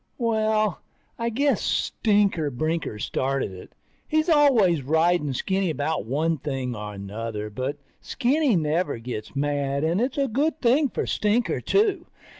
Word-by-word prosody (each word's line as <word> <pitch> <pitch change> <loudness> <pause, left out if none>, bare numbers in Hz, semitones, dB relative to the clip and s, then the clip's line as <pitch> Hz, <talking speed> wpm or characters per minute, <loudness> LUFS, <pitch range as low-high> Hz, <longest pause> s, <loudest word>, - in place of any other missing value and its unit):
Well, 220 - +1 0.4
I 230 0 0
guess 275 +5 +1
Stinker 200 -8 +1
Brinker 155 -2 -2
started 130 +2 -1
it. 90 -1 -12 0.3
He's 310 +2 +1
always 245 - +4
riding 160 +2 +2
Skinny 190 +7 0
about 150 -6 -2
one 155 +5 0
thing 130 -3 -3
or 105 -1 -6
another, 105 +2 -5
but 130 +6 -3 0.2
Skinny 270 -1 +1
never 155 -2 0
gets 115 0 -7
mad 140 0 -1
and 170 +6 +1
it's 255 +3 -1
a 275 -1 +2
good 295 +7 0
thing 270 +4 +3
for - - -3
Stinker, 215 +3 0
too. 395 -4 +1
165 Hz, 140 wpm, -25 LUFS, -, 0.4 s, always